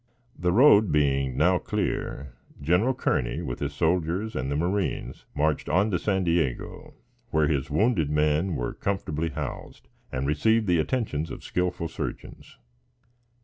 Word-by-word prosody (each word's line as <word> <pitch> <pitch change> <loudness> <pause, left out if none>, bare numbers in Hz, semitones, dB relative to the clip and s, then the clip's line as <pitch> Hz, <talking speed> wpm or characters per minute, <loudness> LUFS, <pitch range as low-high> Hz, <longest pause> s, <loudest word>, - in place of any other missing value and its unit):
The 90 0 0
road 110 - +6
being 70 -3 +1
now 90 +4 +3
clear, 65 -4 -3 0.3
General 90 - +2
Kearney, - - -1
with 60 -2 -4
his 70 0 -3
soldiers 90 +6 0
and 65 +2 -2
the - - 0
marines, 90 +5 -2
marched 75 0 0
on 100 +3 +2
to 90 - +1
San 95 -1 0
Diego, 85 -7 -2 0.3
where 80 -1 +2
his 70 -2 -1
wounded 80 - +2
men 75 +4 +1
were 60 -2 -3
comfortably 85 -5 -2
housed - - -7 0.2
and 65 +1 -2
received 110 +11 +2
the 90 -3 +2
attentions 80 - -1
of - - -8
skillful 90 -2 -1
surgeons. 80 - -7
80 Hz, 145 wpm, -26 LUFS, 75-95 Hz, 0.3 s, road